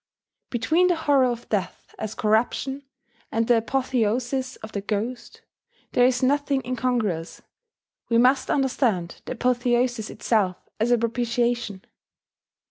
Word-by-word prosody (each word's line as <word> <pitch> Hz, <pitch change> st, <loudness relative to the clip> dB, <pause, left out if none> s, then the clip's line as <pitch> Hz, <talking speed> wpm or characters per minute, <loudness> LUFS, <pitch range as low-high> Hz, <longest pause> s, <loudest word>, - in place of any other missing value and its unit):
Between 315 Hz, +10 st, +2 dB
the 355 Hz, -, +3 dB
horror 285 Hz, -5 st, +3 dB
of 240 Hz, -1 st, -4 dB
death 200 Hz, -5 st, -3 dB
as 220 Hz, 0 st, -4 dB
corruption, 240 Hz, +5 st, 0 dB, 0.5 s
and 225 Hz, 0 st, 0 dB
the 240 Hz, -, +5 dB
apotheosis 255 Hz, +1 st, 0 dB
of 220 Hz, -, -7 dB
the 200 Hz, -, -3 dB
ghost, 220 Hz, +5 st, -4 dB, 0.5 s
there 245 Hz, 0 st, +5 dB
is 255 Hz, 0 st, 0 dB
nothing 280 Hz, 0 st, +1 dB
incongruous: 235 Hz, -9 st, -2 dB, 0.7 s
we 230 Hz, -, +3 dB
must 255 Hz, +3 st, +4 dB
understand 245 Hz, -10 st, 0 dB
the -, -, -4 dB
apotheosis 245 Hz, -2 st, +1 dB
itself 200 Hz, -6 st, 0 dB, 0.2 s
as 225 Hz, +3 st, +1 dB
a 245 Hz, -, +5 dB
propitiation. 235 Hz, -3 st, -1 dB
240 Hz, 125 wpm, -24 LUFS, 220-255 Hz, 0.7 s, the